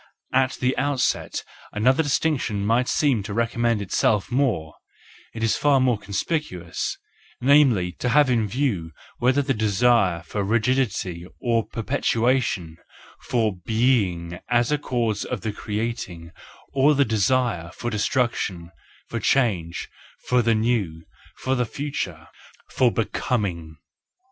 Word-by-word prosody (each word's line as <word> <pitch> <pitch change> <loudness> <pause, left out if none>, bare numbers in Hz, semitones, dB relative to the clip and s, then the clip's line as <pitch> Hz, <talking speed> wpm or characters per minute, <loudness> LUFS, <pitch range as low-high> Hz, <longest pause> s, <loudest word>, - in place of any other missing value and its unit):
At 130 0 +3
the 130 +1 0
out¬ 140 -2 0
set - - -1 0.3
another 130 +8 +3
distinction 135 -8 0
might 120 +4 +2
seem 140 -9 +2
to 100 +1 -6
recommend 115 -1 +1
itself 105 +3 +1
more—it 115 - -4
is 115 - +2
far 145 -2 +3
more 125 -4 +2
conspicuous,—namely, 105 - 0
to 125 - 0
have 145 +3 +5
in 115 -4 +1
view 100 - -1 0.3
whether 130 +3 +3
the 135 0 0
desire 105 -5 +2
for 100 +4 -3
rigidity, 110 -6 0
for 115 -2 0
perpetuation, 115 - 0 0.4
for 110 -5 0
being 95 -5 0
is 120 0 +3
the 150 0 +1
cause 115 -7 -1
of - - -4
the 110 -2 -3
creating, 105 -6 -4 0.4
or 140 +2 +4
the 140 0 +4
desire 110 -4 +1
for 120 +5 -5
destruction, 105 -6 -1 0.4
for - - -3
change, 95 -11 0 0.4
for 125 0 +3
the* 115 -1 +2
new, 110 -8 0 0.3
for 130 - -2
the 125 -2 0
future—for 120 - -3
becoming. 95 -9 -2
115 Hz, 120 wpm, -24 LUFS, 100-130 Hz, 0.4 s, have